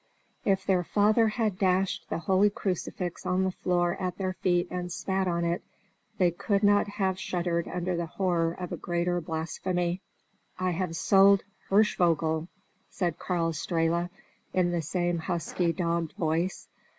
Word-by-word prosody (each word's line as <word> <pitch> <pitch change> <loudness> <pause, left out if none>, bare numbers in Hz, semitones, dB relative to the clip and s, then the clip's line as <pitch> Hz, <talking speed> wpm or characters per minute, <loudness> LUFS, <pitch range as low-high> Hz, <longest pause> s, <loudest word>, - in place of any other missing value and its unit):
If 195 -1 +2
their 185 -2 +2
father 215 +5 +3
had 215 -3 -1
dashed 190 0 +1
the - - -1
holy 190 +4 +3
crucifix 180 -2 -3
on 185 +1 +1
the 190 - +1
floor 175 -1 0
at 180 -2 -2
their 185 -1 -1
feet 175 -1 +1
and 180 -1 -3
spat 190 +1 -1
on 170 -1 0
it, 170 +1 -1 0.5
they 180 -4 +4
could 200 +4 0
not 205 0 +4
have 190 -2 -1
shuddered 175 -2 -1
under 180 0 -2
the 170 -1 -2
horror 170 -2 0
of 180 0 -6
a - - -3
greater 175 0 -1
blasphemy. 170 +3 -2 0.6
"I 185 0 0
have 175 -1 -2
sold 195 +3 +5 0.3
Hirschvogel!" 165 -6 +2 0.4
said 175 -3 -2
Karl 170 -3 0
Strehla, 170 +2 0 0.4
in 180 -1 +2
the 170 -1 0
same 175 +2 -1
husky, 170 +1 -1
dogged 170 -2 -1
voice. 165 +3 -1
180 Hz, 150 wpm, -28 LUFS, 170-190 Hz, 0.6 s, sold